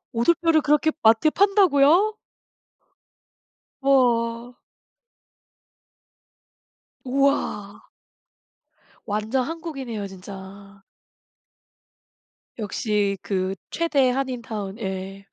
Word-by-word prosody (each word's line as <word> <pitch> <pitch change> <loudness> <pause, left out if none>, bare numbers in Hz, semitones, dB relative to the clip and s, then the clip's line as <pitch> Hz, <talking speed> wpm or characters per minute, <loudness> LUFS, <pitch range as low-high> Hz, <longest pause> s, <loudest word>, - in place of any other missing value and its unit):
오돌뼈를 325 +6 +2
그렇게 300 +2 +2
마트에 225 +7 +5
판다고요? 385 0 +4 1.7
우와. 245 -3 +1 2.5
우와. 260 -6 -1 1.2
완전 215 +5 -1
한국이네요 275 -9 -5
진짜. 195 +1 -12 1.8
역시 210 -2 -1
그 190 -1 -2 0.2
최대 290 -6 +1
한인타운 235 -6 -4
예. 195 -1 -6
235 Hz, 145 characters per minute, -23 LUFS, 200-285 Hz, 2.5 s, 마트에